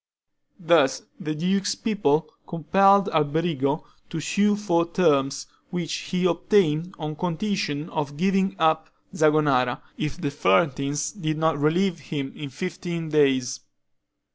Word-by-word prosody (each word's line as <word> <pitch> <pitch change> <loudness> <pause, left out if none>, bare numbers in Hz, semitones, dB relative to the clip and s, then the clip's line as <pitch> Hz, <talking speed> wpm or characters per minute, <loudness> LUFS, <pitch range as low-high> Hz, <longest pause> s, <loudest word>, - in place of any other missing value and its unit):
Thus 165 -6 +3 0.2
the 155 -5 -4
duke's 190 +5 0
people 160 -9 0 0.2
compelled 195 +5 +4
Alberigo 155 -1 0 0.3
to 165 - -4
sue 205 +6 +2
for 170 -5 0
terms, 140 -6 +2 0.2
which 170 -4 -3 0.2
he 180 -1 0
obtained 175 -1 +1
on 155 -1 -5
condition 180 -2 -2
of 145 -2 -3
giving 195 +2 +1
up 160 0 +1 0.2
Zagonara, 150 -5 +2 0.2
if 155 +2 -3
the 145 -5 -2
Florentines 145 -1 +1
did 155 -7 -3
not 160 0 +2
relieve 170 +4 +1
him 140 -2 -5
within 145 -2 -7
fifteen 170 +2 -5
days. 135 -4 +2
160 Hz, 120 wpm, -24 LUFS, 145-180 Hz, 0.3 s, compelled